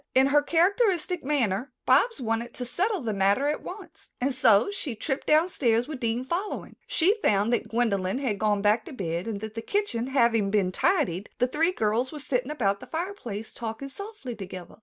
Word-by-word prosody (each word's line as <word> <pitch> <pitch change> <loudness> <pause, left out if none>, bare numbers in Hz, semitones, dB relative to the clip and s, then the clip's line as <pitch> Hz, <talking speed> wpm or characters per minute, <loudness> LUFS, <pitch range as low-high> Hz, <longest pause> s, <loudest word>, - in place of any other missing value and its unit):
In 260 +1 +6
her 290 +2 +4
characteristic 360 +1 +2
manner 255 -4 0
Bobs 295 - +4
wanted 230 -1 -2
to 250 - -4
settle 380 - -1
the 225 -4 -2
matter 200 +8 +2
at 300 - -1
once, 360 -5 -10
and 265 +2 0
so 225 - +4
she 305 - -4
tripped 265 +5 -3
downstairs 285 -8 +3
with 300 -4 -6
Dean 235 +1 -1
following. 360 +8 -4
She 390 +7 +3
found 205 +3 +2
that 240 - -1
Gwendolyn 200 -4 0
had 245 -7 -2
gone 210 -2 +1
back 215 +2 +3
to - - -9
bed 175 -4 -3
and 205 -3 -4
that 220 -1 -6
the 225 - -4
kitchen 260 - -1
having 235 -6 +2
been 195 -3 +1
tidied, 220 - +1
the 250 - +3
three 320 +7 +2
girls 225 - 0
were 310 - -7
sitting 260 -2 -2
about 200 -10 0
the - - -11
fireplace 320 - -5
talking 230 +4 -5
softly 400 - -7
together. 185 -3 -9
250 Hz, 190 wpm, -27 LUFS, 215-310 Hz, -, In